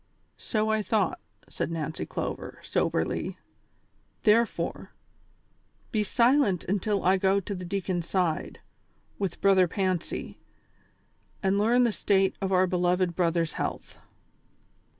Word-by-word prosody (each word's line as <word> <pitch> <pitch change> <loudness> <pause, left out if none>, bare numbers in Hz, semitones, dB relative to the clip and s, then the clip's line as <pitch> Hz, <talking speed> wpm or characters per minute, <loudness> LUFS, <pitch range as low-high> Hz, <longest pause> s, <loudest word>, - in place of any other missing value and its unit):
" - - -44 0.2
So 215 -1 +1
I 220 0 +1
thought," 205 -3 0 0.3
said - - -3
Nancy 160 0 -4
Clover, - - -5
soberly; - - -1 0.4
" - - -41
therefore, 225 +2 +1 1.0
be 215 -1 +1
silent 235 - +3
until 200 +1 -1
I 190 +1 +5
go 195 +1 +2
to 200 - -5
the 180 -2 -6
deacon's 180 -2 -2
side, 180 -5 -1 0.6
with 195 -4 -2
Brothei* 190 -2 +5
Fancy, 185 -4 -2 1.0
and 195 +1 +2
learn 235 +4 +4
the 235 - +3
state 195 -2 +2
of 195 0 -1
our 185 0 +4
beloved 180 -1 +1
brother's 170 -2 +1
health." - - -5
190 Hz, 125 wpm, -27 LUFS, 180-210 Hz, 1.0 s, I